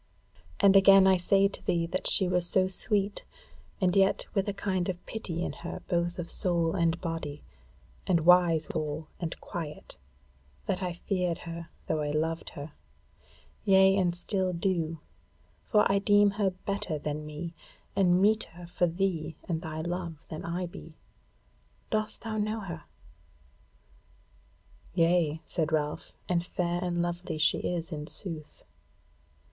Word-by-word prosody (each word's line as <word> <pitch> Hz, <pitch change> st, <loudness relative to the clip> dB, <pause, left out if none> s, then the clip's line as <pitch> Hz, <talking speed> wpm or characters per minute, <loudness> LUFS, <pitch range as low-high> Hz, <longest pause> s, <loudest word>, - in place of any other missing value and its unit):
And 200 Hz, -1 st, +6 dB
again 195 Hz, 0 st, +8 dB
I 190 Hz, -1 st, +6 dB
say 195 Hz, +2 st, +4 dB
to 200 Hz, -, -7 dB
thee 170 Hz, -3 st, +1 dB
that 175 Hz, +2 st, +1 dB
she 190 Hz, -, +5 dB
was 180 Hz, -1 st, +2 dB
so 185 Hz, 0 st, +3 dB
sweet 200 Hz, +1 st, -1 dB, 0.6 s
and 185 Hz, -2 st, +2 dB
yet 195 Hz, 0 st, +3 dB
with 195 Hz, -1 st, +1 dB
a -, -, +1 dB
kind 190 Hz, -3 st, -1 dB
of 180 Hz, -1 st, -5 dB
pity 175 Hz, -6 st, -4 dB
in -, -, -3 dB
her 170 Hz, -, -7 dB
both 175 Hz, -1 st, 0 dB
of 175 Hz, -1 st, -4 dB
soul 170 Hz, -3 st, 0 dB
and 170 Hz, -2 st, +1 dB
body, 165 Hz, -4 st, -4 dB, 0.6 s
and 175 Hz, -3 st, +3 dB
wise 175 Hz, -3 st, +5 dB
withal 155 Hz, 0 st, -3 dB
and 170 Hz, -2 st, -4 dB
quiet, 155 Hz, -3 st, -6 dB, 0.7 s
that 190 Hz, 0 st, -1 dB
I 180 Hz, -2 st, -2 dB
feared 180 Hz, -1 st, -1 dB
her, 170 Hz, 0 st, -7 dB, 0.2 s
though 155 Hz, -1 st, 0 dB
I 145 Hz, -, -1 dB
loved 160 Hz, +2 st, -1 dB
her; 145 Hz, +2 st, -7 dB, 0.9 s
yea 190 Hz, -1 st, +6 dB
and 180 Hz, -3 st, +1 dB
still 185 Hz, +1 st, -1 dB
do: 170 Hz, -2 st, -1 dB, 0.7 s
for 210 Hz, -2 st, +4 dB
I 195 Hz, 0 st, +3 dB
deem 205 Hz, 0 st, +5 dB
her 200 Hz, -1 st, +1 dB
better 185 Hz, -3 st, -3 dB
than 150 Hz, +1 st, -4 dB
me, 150 Hz, +3 st, -6 dB, 0.4 s
and 180 Hz, -2 st, +4 dB
meeter 200 Hz, -4 st, +1 dB
for 175 Hz, -, +2 dB
thee 170 Hz, -3 st, -1 dB
and 165 Hz, -2 st, -1 dB
thy 160 Hz, -2 st, -4 dB
love 170 Hz, -1 st, -4 dB
than 155 Hz, -, -6 dB
I 175 Hz, +2 st, -2 dB
be. 165 Hz, -2 st, -11 dB, 0.9 s
Dost 215 Hz, 0 st, -1 dB
thou 220 Hz, -1 st, -3 dB
know 215 Hz, +1 st, -1 dB
her?" 170 Hz, -6 st, -7 dB, 2.1 s
"Yea," 165 Hz, -2 st, +2 dB
said 160 Hz, -1 st, -1 dB
Ralph, 150 Hz, -1 st, -1 dB, 0.2 s
"and 170 Hz, -1 st, +1 dB
fair 175 Hz, 0 st, -2 dB
and 175 Hz, -1 st, 0 dB
lovely 175 Hz, -1 st, -3 dB
she 155 Hz, -, +3 dB
is 170 Hz, -1 st, -3 dB
in 150 Hz, -1 st, -5 dB
sooth. 165 Hz, -5 st, -7 dB
175 Hz, 150 wpm, -29 LUFS, 165-190 Hz, 2.1 s, again